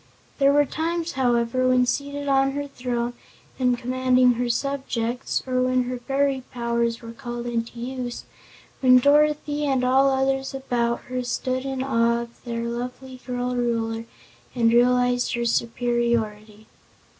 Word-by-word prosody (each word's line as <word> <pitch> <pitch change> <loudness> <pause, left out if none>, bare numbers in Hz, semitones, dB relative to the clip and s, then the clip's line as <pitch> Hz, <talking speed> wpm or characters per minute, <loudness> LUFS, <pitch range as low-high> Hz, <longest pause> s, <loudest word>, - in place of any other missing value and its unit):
There 275 0 +5
were 290 0 +4
times, 330 +3 -2
however, 245 0 +1
when 255 0 +4
seated 285 +2 -2
on 270 0 +3
her 285 0 -3
throne 245 -3 -3 0.5
and 250 -1 +2
commanding 255 0 +3
her 240 +1 -2
subjects, 250 -2 -2
or 255 -1 0
when 255 0 +2
her 250 0 -4
fairy 275 +1 0
powers 235 -1 -1
were 230 - -7
called 240 +1 -6
into 235 0 -3
use, 245 0 -5 0.6
when 255 -1 +6
Dorothy 295 +2 +3
and 265 -2 +1
all 265 +2 +4
others 270 0 0
about 240 -3 -1
her 255 0 -4
stood 255 +1 -2
in 265 -1 -2
awe 235 -2 +2
of 235 0 -15
their 235 -1 -3
lovely 250 +2 -5
girl 250 0 -2
Ruler 230 -2 -1 0.5
and 230 -1 +3
realized 245 0 +3
her 235 0 -1
superiority. 230 -3 -1
250 Hz, 145 wpm, -24 LUFS, 235-265 Hz, 0.6 s, when